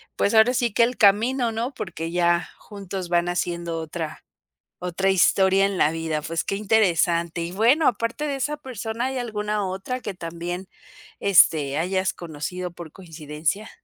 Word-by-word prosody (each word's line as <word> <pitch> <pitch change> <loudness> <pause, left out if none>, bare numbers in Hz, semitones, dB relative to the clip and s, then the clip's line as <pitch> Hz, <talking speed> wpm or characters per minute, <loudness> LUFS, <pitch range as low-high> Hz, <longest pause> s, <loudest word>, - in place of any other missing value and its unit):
pues 200 - +1
ahora 220 +3 +6
sí 240 -3 +1
que 235 - +4
el 245 +1 0
camino 230 +4 +3
¿no? 235 +5 -3
Porque 165 -6 -5
ya 175 0 +2
juntos 195 -3 -7
van 175 0 +2
haciendo 170 -2 -2
otra 160 0 -6 0.6
otra 180 +2 -1
historia 190 +1 +4
en 200 -1 -2
la 150 - +3
vida, 160 -2 -2
pues 165 +1 -3
qué - - -1
interesante, 175 -5 +2
y 170 +1 -4
bueno, 235 - +3
aparte 230 +5 -3
de 280 - -2
esa 290 +3 -1
persona, 240 -3 -4
¿hay 265 0 -3
alguna 210 -3 -2
otra 195 +7 -4
que 205 - -5
también, 175 +1 -6 0.5
este, 155 -7 +4
hayas 185 +3 0
conocido 175 +2 -6
por 170 -2 -10
coincidencia? 165 +2 -4
190 Hz, 160 wpm, -24 LUFS, 170-220 Hz, 0.6 s, ahora